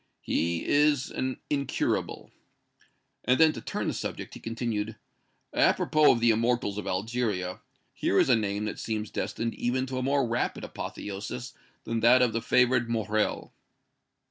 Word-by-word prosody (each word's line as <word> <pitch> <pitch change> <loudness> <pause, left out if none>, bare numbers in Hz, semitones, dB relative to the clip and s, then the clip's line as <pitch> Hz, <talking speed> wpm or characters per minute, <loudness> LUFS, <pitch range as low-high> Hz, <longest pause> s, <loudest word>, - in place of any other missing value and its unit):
"He 85 0 0
is 145 -2 +3
an 130 0 -3
incurable." 140 -2 -1 1.0
Then, 125 +1 +4
as 160 - +8
if - - -2
to 115 - -7
turn - - -3
the - - 0
subject, - - -5
he - - -9
continued: 115 -2 -3 0.6
"Apropos 155 -1 +4
of 115 - -1
the 115 0 +5
immortals 115 -2 0
of - - -6
Algeria, 100 -2 -2 0.3
here 100 - 0
is - - +5
a 125 - +5
name 105 -1 -1
that 105 - -4
seems 110 -2 -3
destined 115 +4 -2
even 130 +2 -1
to 130 -1 -4
a - - -2
more 135 0 +1
rapid 120 +2 -1
apotheosis 95 - -6 0.3
than 115 0 -2
that 125 +3 +6
of 120 -3 +1
the 115 - -1
favored 125 -1 +3
Morrel." 110 -2 -1
115 Hz, 160 wpm, -28 LUFS, 105-125 Hz, 1.0 s, as